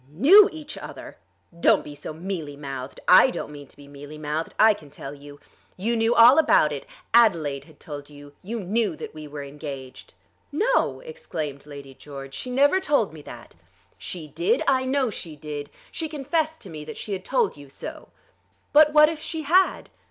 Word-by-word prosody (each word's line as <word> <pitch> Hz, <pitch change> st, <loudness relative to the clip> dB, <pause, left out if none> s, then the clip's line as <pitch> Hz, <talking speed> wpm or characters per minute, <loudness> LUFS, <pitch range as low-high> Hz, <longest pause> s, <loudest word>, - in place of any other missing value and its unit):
"Knew 330 Hz, -, +7 dB
each 310 Hz, -2 st, -9 dB
other! -, -, -10 dB, 0.4 s
Don't -, -, +4 dB
be 145 Hz, -, -9 dB
so 145 Hz, -, -8 dB
mealy 160 Hz, -3 st, -5 dB
mouthed. 135 Hz, -2 st, -7 dB
I 185 Hz, +8 st, +8 dB
don't 245 Hz, -, -5 dB
mean 145 Hz, -1 st, -10 dB
to -, -, -22 dB
be 145 Hz, -1 st, -14 dB
mealy 145 Hz, +2 st, -11 dB
mouthed, 155 Hz, +2 st, -3 dB
I 220 Hz, 0 st, +6 dB
can 155 Hz, -8 st, -14 dB
tell 140 Hz, 0 st, -9 dB
you. 145 Hz, 0 st, -13 dB, 0.4 s
You 225 Hz, +6 st, -1 dB
knew 225 Hz, +1 st, +2 dB
all 245 Hz, +6 st, +8 dB
about 220 Hz, -, +4 dB
it. 140 Hz, -2 st, -6 dB, 0.3 s
Adelaide 165 Hz, -12 st, +3 dB
had 155 Hz, -3 st, -20 dB
told 145 Hz, -3 st, -9 dB
you. 145 Hz, -1 st, -14 dB
You 225 Hz, +4 st, -5 dB
knew 200 Hz, -1 st, 0 dB
that -, -, -8 dB
we 155 Hz, -1 st, -9 dB
were 145 Hz, -1 st, -7 dB
engaged." 140 Hz, -2 st, -9 dB, 0.4 s
"No," 445 Hz, +12 st, +1 dB
exclaimed 160 Hz, -, -6 dB
Lady 140 Hz, -2 st, -10 dB
George; 135 Hz, 0 st, -10 dB
"she 250 Hz, -, -6 dB
never 285 Hz, +8 st, +3 dB
told 285 Hz, -, +1 dB
me 155 Hz, -, -10 dB
that." -, -, -12 dB, 0.4 s
"She 165 Hz, -4 st, -7 dB
did. 380 Hz, -, 0 dB
I 260 Hz, -1 st, +3 dB
know 260 Hz, -2 st, +1 dB
she 165 Hz, -5 st, -7 dB
did. 145 Hz, -1 st, -7 dB, 0.2 s
She 320 Hz, -2 st, -3 dB
confessed 315 Hz, +2 st, -2 dB
to 195 Hz, -, -10 dB
me 155 Hz, -1 st, -7 dB
that 155 Hz, -, -8 dB
she 210 Hz, -, -5 dB
had 185 Hz, -1 st, -4 dB
told 475 Hz, -, 0 dB
you 140 Hz, -1 st, -13 dB
so." -, -, -9 dB, 0.6 s
"But 300 Hz, 0 st, +6 dB
what 305 Hz, 0 st, +8 dB
if 320 Hz, -1 st, -4 dB
she 315 Hz, 0 st, -5 dB
had?" 365 Hz, +6 st, +2 dB
170 Hz, 190 wpm, -24 LUFS, -, 0.6 s, I